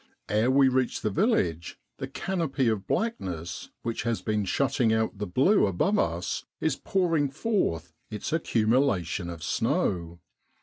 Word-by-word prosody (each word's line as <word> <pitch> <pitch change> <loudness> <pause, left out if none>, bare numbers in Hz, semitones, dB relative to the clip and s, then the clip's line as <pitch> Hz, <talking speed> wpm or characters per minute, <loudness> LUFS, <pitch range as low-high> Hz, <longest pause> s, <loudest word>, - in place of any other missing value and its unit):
Ere 105 +5 +2
we 135 +1 +5
reach 130 -1 0
the 105 - -1
village, 90 - 0 0.2
the - - -4
canopy 160 -9 -1
of 110 -3 -1
blackness 90 - -3
which 115 -1 -2
has 115 -1 -2
been 105 -2 0
shutting 120 +2 +1
out 110 -2 0
the 105 - -2
blue 135 - +4
above 190 - +1
us 85 +2 -1 0.2
is 160 -4 +1
pouring 165 -7 +1
forth 135 - -1 0.2
its 105 +7 -4
accumulation 110 - +1
of 85 -3 -7
snow. 85 -2 -1
110 Hz, 140 wpm, -27 LUFS, 90-145 Hz, 0.2 s, we